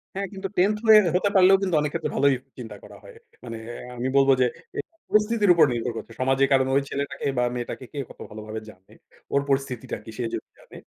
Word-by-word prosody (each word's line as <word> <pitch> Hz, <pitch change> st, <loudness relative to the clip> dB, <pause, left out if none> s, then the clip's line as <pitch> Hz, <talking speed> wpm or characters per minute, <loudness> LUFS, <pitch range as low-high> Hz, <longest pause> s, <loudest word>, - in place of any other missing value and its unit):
হ্যাঁ, 195 Hz, 0 st, -2 dB
কিন্তু 195 Hz, 0 st, -4 dB
10th 210 Hz, +3 st, +3 dB
হয়ে 215 Hz, -1 st, +9 dB, 0.2 s
হতে 200 Hz, +2 st, +2 dB
পারলেও 190 Hz, 0 st, +7 dB
কিন্তু 185 Hz, -4 st, 0 dB
অনেক 150 Hz, -, -1 dB
ক্ষেত্রে 160 Hz, -3 st, -2 dB
ভালোই 140 Hz, -1 st, +4 dB, 0.2 s
চিন্তা 110 Hz, -4 st, -8 dB
করা -, -, -13 dB
হয়। -, -, -13 dB, 0.3 s
মানে 115 Hz, -, -6 dB, 0.4 s
আমি 125 Hz, +2 st, -2 dB
বলব 135 Hz, 0 st, +4 dB
যে, 125 Hz, -, +5 dB, 0.3 s
এটা -, -, -4 dB, 0.2 s
পরিস্থিতির 210 Hz, -2 st, +3 dB
উপর 170 Hz, -, +6 dB
নির্ভর 120 Hz, +1 st, -2 dB
করছে। -, -, -8 dB
সমাজে 135 Hz, +1 st, +3 dB
কারণ, 130 Hz, 0 st, +3 dB
ওই 140 Hz, -, +4 dB
ছেলেটাকে 140 Hz, 0 st, -3 dB
বা 125 Hz, -, +2 dB
মেয়েটাকে 125 Hz, +1 st, -5 dB
কে -, -, -10 dB
কত -, -, -15 dB
ভালোভাবে 110 Hz, +1 st, -7 dB
জানে? 95 Hz, -2 st, -18 dB, 0.4 s
ওর 140 Hz, -, +3 dB
পরিস্থিতিটা 135 Hz, -3 st, -2 dB
কি? 110 Hz, -, -12 dB
সে 125 Hz, -, -2 dB
যদি -, -, -5 dB
জানে, -, -, -15 dB
140 Hz, 210 wpm, -24 LUFS, 125-190 Hz, 0.4 s, হয়ে